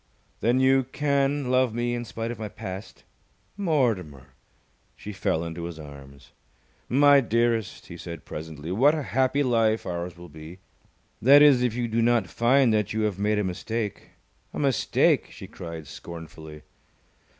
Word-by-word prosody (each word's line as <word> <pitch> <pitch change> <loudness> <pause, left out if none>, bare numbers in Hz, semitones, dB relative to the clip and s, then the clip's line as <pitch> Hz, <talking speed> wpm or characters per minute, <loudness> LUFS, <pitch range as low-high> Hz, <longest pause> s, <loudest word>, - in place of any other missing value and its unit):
"Then 120 +3 +2
you 130 0 +3
can 140 0 0
love 130 -3 +2
me 120 0 -1
in 120 0 -3
spite 115 +2 -5
of 120 - -8
my 110 -1 -5
past?" 95 +1 -8 0.5
"Mortimer!" 105 - -1 0.6
She 105 - -8
fell 85 -3 -1
into 85 0 -6
his 85 -1 -7
arms. 70 -3 -13 0.6
"My 145 +2 +6
dearest," 115 -3 -1
he 85 - -10
said 85 -2 -8
presently, 80 +1 -7
"what 135 +11 +4
a 155 - -3
happy 130 +2 +1
life 115 -3 +1
ours 90 -1 -5
will 85 0 -11
be. 80 +3 -11 0.6
That 140 +4 +7
is, 140 -4 +6
if 125 -3 0
you 120 -1 -1
do 115 +1 0
not 120 0 +3
find 125 0 +3
that 105 -1 0
you 110 - -1
have 105 -3 -1
made 105 +1 +1
a 105 - +1
mistake." 105 +3 -4 0.5
"A - - -4
mistake!" 135 -5 +2
she - - -11
cried, 85 -2 -8
scornfully. 80 0 -10
110 Hz, 160 wpm, -25 LUFS, 85-130 Hz, 0.6 s, That